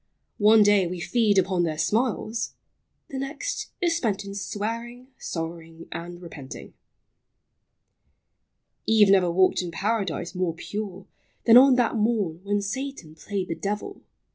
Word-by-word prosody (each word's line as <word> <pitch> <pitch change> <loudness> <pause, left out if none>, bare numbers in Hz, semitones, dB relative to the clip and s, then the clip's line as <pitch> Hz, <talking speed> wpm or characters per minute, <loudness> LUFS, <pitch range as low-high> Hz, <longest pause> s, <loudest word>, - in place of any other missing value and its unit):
One 215 +1 +7
day 205 -3 +4
we 180 +1 -5
feed 205 +3 +2
upon 185 -1 +2
their 160 -3 -1
smiles, 225 +5 -1 0.2
— - - -50
the 265 - -4
next 275 +3 -4
Is 340 -2 +2
spent 215 - -1
in 200 - -7
swearing, 230 +5 -5
sorrowing, 165 0 -6
and 175 +1 -7
repenting....... 160 -6 -10 2.1
Eve 215 -3 +6
never 185 -3 +4
walked 185 +2 +3
in 180 - -5
Paradise 190 -2 -2
more 180 -3 -1
pure 195 +1 -6 0.4
Than 230 - +7
on 260 +1 +8
that 245 -2 +1
morn 210 -7 0
when 205 0 0
Satan 260 - -5
played 190 +3 -4
the - - 0
devil 205 +4 -4
LIFE. - - -25
200 Hz, 140 wpm, -25 LUFS, 175-225 Hz, 2.1 s, on